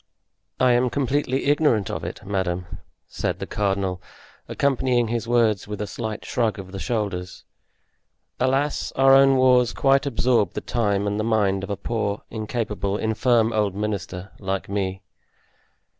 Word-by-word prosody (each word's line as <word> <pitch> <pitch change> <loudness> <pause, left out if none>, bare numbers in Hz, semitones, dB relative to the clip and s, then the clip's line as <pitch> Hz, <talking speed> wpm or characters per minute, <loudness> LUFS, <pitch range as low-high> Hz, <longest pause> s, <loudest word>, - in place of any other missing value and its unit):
"I 130 -1 +4
am 125 +1 +3
completely 135 0 0
ignorant 145 - +2
of - - -4
it, - - -7
madame," 90 -3 -2 0.4
said - - -3
the - - -5
cardinal, 95 -3 -1 0.5
accompanying 130 -4 +1
his 115 0 -2
words 115 -5 +2
with 105 -1 -5
a 105 - -2
slight 110 0 -5
shrug 115 -4 0
of 95 -1 -9
the 95 - -6
shoulders; 100 -6 -3 1.0
"alas, 135 +3 0
our 135 0 +5
own 135 0 +6
wars 125 -2 +4
quite 135 +1 +2
absorb 120 -6 +1
the - - -4
time 100 -4 0
and 105 +1 -1
the - - 0
mind 100 -4 +1
of 95 - -5
a 100 - -2
poor, 105 0 -2
incapable, 110 -3 -2
infirm 115 +1 +2
old 105 -3 0
minister 100 -3 -4
like 95 -1 -3
me." 95 -1 -3
110 Hz, 150 wpm, -23 LUFS, 100-125 Hz, 1.0 s, own